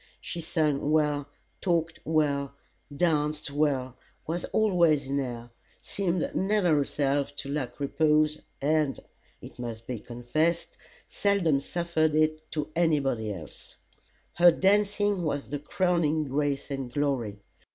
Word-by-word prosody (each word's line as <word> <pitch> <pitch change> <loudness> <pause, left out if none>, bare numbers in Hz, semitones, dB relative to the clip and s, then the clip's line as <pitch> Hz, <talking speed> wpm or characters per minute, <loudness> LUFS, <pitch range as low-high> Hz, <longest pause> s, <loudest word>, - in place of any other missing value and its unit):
She 170 - -5
sung 150 -3 0
well, 150 -2 +2 0.3
talked 165 -3 0
well, 145 -3 0 0.4
danced 150 -3 +1
well 140 -4 0 0.3
was 170 +2 -2
always 170 -9 +3
in 140 +1 -1
air 120 -3 -5 0.3
seemed 180 -4 -1
never 190 -3 +2
herself 140 0 0
to 140 -1 -5
lack 140 -3 -3
repose, 155 +1 +2 0.2
and, 150 -1 +1 0.4
it - - -11
must 115 -2 -6
be 125 -2 -4
confessed, 125 +9 -1 0.3
seldom 190 -8 +2
suffered 160 0 0
it 155 0 +1
to 150 -1 -3
any 165 -3 +3
body 115 -6 -1
else. 85 -7 -10 0.6
Her 175 0 +7
dancing 205 +1 +2
was 145 -4 -2
the 145 - -2
crowning 160 -1 +1
grace 140 0 -1
and 135 -3 -4
glory. 130 -8 -1
150 Hz, 125 wpm, -28 LUFS, 140-170 Hz, 0.6 s, Her